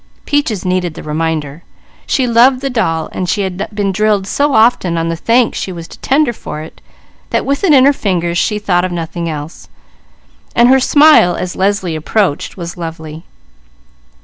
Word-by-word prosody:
_" -, -, -37 dB
Peaches 235 Hz, -10 st, -1 dB
needed 180 Hz, -3 st, -1 dB
the -, -, -9 dB
reminder. 155 Hz, -1 st, -3 dB, 0.5 s
She 260 Hz, -, +1 dB
loved 250 Hz, +2 st, +4 dB
the 275 Hz, -1 st, -2 dB
doll. 165 Hz, -9 st, -1 dB, 0.2 s
She 200 Hz, +3 st, 0 dB
had 190 Hz, +1 st, -4 dB
been 200 Hz, -2 st, 0 dB
drilled 210 Hz, 0 st, +1 dB
so 285 Hz, +7 st, 0 dB
often 220 Hz, -7 st, +3 dB
on 165 Hz, 0 st, -1 dB
the 165 Hz, -, -2 dB
thanks 230 Hz, +7 st, +1 dB
she 190 Hz, -, -4 dB
was 170 Hz, -2 st, -8 dB
to -, -, -13 dB
tender 275 Hz, -2 st, +1 dB
for 155 Hz, -8 st, -7 dB
it, 160 Hz, -, -12 dB, 0.5 s
that -, -, -1 dB
with 280 Hz, +4 st, -1 dB
it 375 Hz, -, +3 dB
in 265 Hz, -3 st, +6 dB
her 285 Hz, -, +5 dB
fingers 175 Hz, -7 st, -1 dB
she 210 Hz, -, 0 dB
thought 180 Hz, -4 st, 0 dB
of 185 Hz, -, -2 dB
nothing 170 Hz, 0 st, -4 dB
else, 150 Hz, +1 st, -8 dB, 0.9 s
so 235 Hz, -, +6 dB
her 265 Hz, +2 st, +5 dB
smile 290 Hz, -, +5 dB
as 180 Hz, -, -4 dB
Leslie 190 Hz, -3 st, 0 dB
approached 165 Hz, +1 st, -1 dB
was 175 Hz, 0 st, -7 dB
lovely. 160 Hz, -1 st, -8 dB
185 Hz, 180 wpm, -14 LUFS, 165-235 Hz, 0.9 s, in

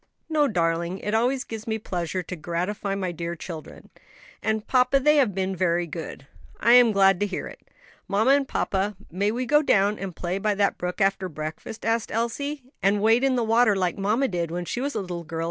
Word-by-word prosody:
"No, 300 Hz, -2 st, +3 dB
darling; 170 Hz, -3 st, 0 dB
it 210 Hz, +2 st, -4 dB
always 250 Hz, +4 st, +1 dB
gives 225 Hz, +1 st, -8 dB
me 220 Hz, 0 st, 0 dB
pleasure 180 Hz, -3 st, -3 dB
to 180 Hz, -, -6 dB
gratify 180 Hz, +5 st, -3 dB
my 190 Hz, -2 st, -2 dB
dear 170 Hz, +1 st, -4 dB
children. 160 Hz, -2 st, -9 dB, 0.5 s
And, 220 Hz, 0 st, -1 dB
papa, 255 Hz, +1 st, +3 dB
they 300 Hz, +3 st, +4 dB
have 240 Hz, -9 st, +3 dB
been 190 Hz, 0 st, -1 dB
very 175 Hz, -1 st, +1 dB
good." 160 Hz, -4 st, -7 dB, 0.3 s
"I 235 Hz, -, +3 dB
am 245 Hz, -2 st, +7 dB
glad 195 Hz, -2 st, +4 dB
to 205 Hz, -, +1 dB
hear 190 Hz, -, -4 dB
it." -, -, -11 dB, 0.5 s
"Mamma 210 Hz, +6 st, +3 dB
and 280 Hz, -1 st, +3 dB
papa, 200 Hz, -2 st, -1 dB, 0.2 s
may 200 Hz, +4 st, 0 dB
we 245 Hz, +4 st, -2 dB
go 295 Hz, +4 st, +4 dB
down 205 Hz, -6 st, +2 dB
and 190 Hz, -3 st, -5 dB
play 180 Hz, +2 st, -3 dB
by 210 Hz, 0 st, 0 dB
that 200 Hz, 0 st, +1 dB
brook 180 Hz, +3 st, -3 dB
after 195 Hz, -1 st, +1 dB
breakfast?" 155 Hz, +7 st, -7 dB
asked 225 Hz, 0 st, 0 dB
Elsie. 265 Hz, +6 st, -2 dB, 0.2 s
"And 200 Hz, +2 st, +3 dB
wade 225 Hz, +4 st, +3 dB
in 270 Hz, -1 st, +3 dB
the 240 Hz, -, +1 dB
water 225 Hz, -1 st, +4 dB
like 185 Hz, -2 st, 0 dB
mamma 215 Hz, +7 st, +1 dB
did 175 Hz, -5 st, -2 dB
when 175 Hz, +1 st, -4 dB
she 245 Hz, -, -3 dB
was 285 Hz, +2 st, -2 dB
a -, -, 0 dB
little 175 Hz, -2 st, -5 dB
girl?" 165 Hz, 0 st, -6 dB
200 Hz, 215 wpm, -25 LUFS, 180-235 Hz, 0.5 s, am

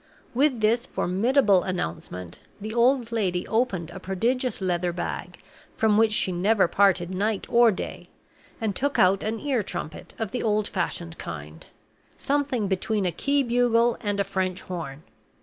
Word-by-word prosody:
With 260 Hz, -2 st, +2 dB
this 230 Hz, +3 st, +2 dB
formidable 205 Hz, +1 st, +2 dB
announcement, 90 Hz, -, -5 dB, 0.2 s
the 215 Hz, +2 st, -5 dB
old 240 Hz, 0 st, +3 dB
lady 185 Hz, -6 st, -1 dB
opened 200 Hz, -8 st, 0 dB
a 190 Hz, -, -8 dB
prodigious 230 Hz, +6 st, -1 dB
leather 180 Hz, -2 st, 0 dB
bag, 175 Hz, 0 st, -5 dB, 0.4 s
from 220 Hz, -2 st, +3 dB
which 220 Hz, 0 st, +4 dB
she 200 Hz, -3 st, +1 dB
never 190 Hz, +3 st, +3 dB
parted 185 Hz, -2 st, +2 dB
night 200 Hz, +2 st, -1 dB
or 235 Hz, 0 st, +5 dB
day, 190 Hz, -, -6 dB, 0.5 s
and 220 Hz, -4 st, -1 dB
took 285 Hz, +6 st, 0 dB
out 190 Hz, +1 st, +4 dB
an 220 Hz, +1 st, -2 dB
ear 270 Hz, -6 st, 0 dB
trumpet 155 Hz, -5 st, -6 dB
of 220 Hz, -3 st, -3 dB
the 250 Hz, -, -2 dB
old 210 Hz, -1 st, +1 dB
fashioned 170 Hz, -2 st, -3 dB
kind 75 Hz, -1 st, -8 dB, 0.5 s
something 275 Hz, -6 st, 0 dB
between 195 Hz, +2 st, 0 dB
a 180 Hz, -, +1 dB
key 280 Hz, +8 st, +1 dB
bugle 240 Hz, -1 st, +3 dB
and 205 Hz, -1 st, -1 dB
a -, -, +3 dB
French 185 Hz, -1 st, -2 dB
horn. 160 Hz, -5 st, -6 dB
205 Hz, 155 wpm, -25 LUFS, 180-235 Hz, 0.5 s, or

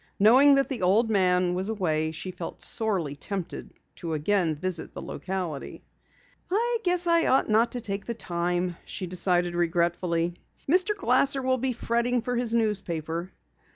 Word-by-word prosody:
Knowing 260 Hz, +7 st, +6 dB
that 275 Hz, 0 st, +2 dB
the 265 Hz, -6 st, -4 dB
old 215 Hz, +5 st, +3 dB
man 180 Hz, -3 st, +3 dB
was 190 Hz, +3 st, -2 dB
away 160 Hz, -7 st, 0 dB
she 175 Hz, +4 st, -5 dB
felt 175 Hz, -2 st, -7 dB
sorely 190 Hz, -10 st, -1 dB
tempted 185 Hz, +4 st, -6 dB, 0.2 s
to 165 Hz, -2 st, -4 dB
again 165 Hz, +1 st, +1 dB
visit 170 Hz, +1 st, -3 dB
the -, -, -5 dB
locality. 180 Hz, -6 st, -5 dB, 0.7 s
"I 465 Hz, +5 st, +1 dB
guess 360 Hz, 0 st, +3 dB
I 335 Hz, -1 st, +3 dB
ought 260 Hz, -, +3 dB
not 225 Hz, +2 st, +3 dB
to 245 Hz, -, -3 dB
take 200 Hz, -3 st, -3 dB
the 235 Hz, -, -4 dB
time," 175 Hz, -2 st, -2 dB
she 190 Hz, -, -5 dB
decided 175 Hz, -1 st, 0 dB
regretfully. 170 Hz, 0 st, 0 dB, 0.3 s
"Mr. 365 Hz, +7 st, +3 dB
Glasser 270 Hz, -5 st, +2 dB
will 260 Hz, 0 st, +1 dB
be 260 Hz, +1 st, 0 dB
fretting 235 Hz, 0 st, 0 dB
for 245 Hz, +1 st, -2 dB
his 225 Hz, -4 st, +1 dB
paper." 165 Hz, +1 st, -4 dB
195 Hz, 155 wpm, -26 LUFS, 175-245 Hz, 0.7 s, Knowing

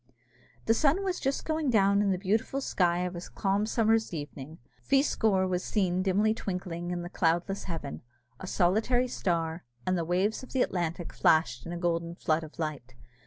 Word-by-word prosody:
The 225 Hz, -, +4 dB
sun 305 Hz, -, +2 dB
was 375 Hz, -2 st, -1 dB
just 270 Hz, 0 st, -1 dB
going 315 Hz, -3 st, 0 dB
down 200 Hz, -3 st, +4 dB
in 205 Hz, -, +2 dB
the 190 Hz, -, +1 dB
beautiful 215 Hz, +8 st, 0 dB
sky 180 Hz, -9 st, +1 dB
of 180 Hz, 0 st, -3 dB
a 170 Hz, -, -5 dB
calm 200 Hz, +3 st, -1 dB
summer's 225 Hz, -4 st, +2 dB
evening. 150 Hz, 0 st, -7 dB, 0.2 s
Feascor 220 Hz, -8 st, +2 dB
was 180 Hz, 0 st, -1 dB
seen 185 Hz, -3 st, 0 dB
dimly 200 Hz, +3 st, +2 dB
twinkling 180 Hz, -4 st, -4 dB
in 175 Hz, -1 st, -3 dB
the -, -, -5 dB
cloudless 175 Hz, +4 st, 0 dB
heaven, 165 Hz, -6 st, -5 dB, 0.4 s
a 190 Hz, -, -7 dB
solitary 220 Hz, +9 st, +2 dB
star, 170 Hz, -7 st, -1 dB, 0.2 s
and 185 Hz, -, +1 dB
the 170 Hz, -, 0 dB
waves 185 Hz, +6 st, 0 dB
of 260 Hz, -, -11 dB
the 260 Hz, -, +3 dB
Atlantic 175 Hz, -1 st, -3 dB
flashed 155 Hz, -6 st, +2 dB
in -, -, -5 dB
a 175 Hz, -, -4 dB
golden 170 Hz, -1 st, -1 dB
flood 160 Hz, -1 st, 0 dB
of 155 Hz, -, -11 dB
light. 145 Hz, -6 st, -4 dB
185 Hz, 180 wpm, -29 LUFS, 170-220 Hz, 0.4 s, The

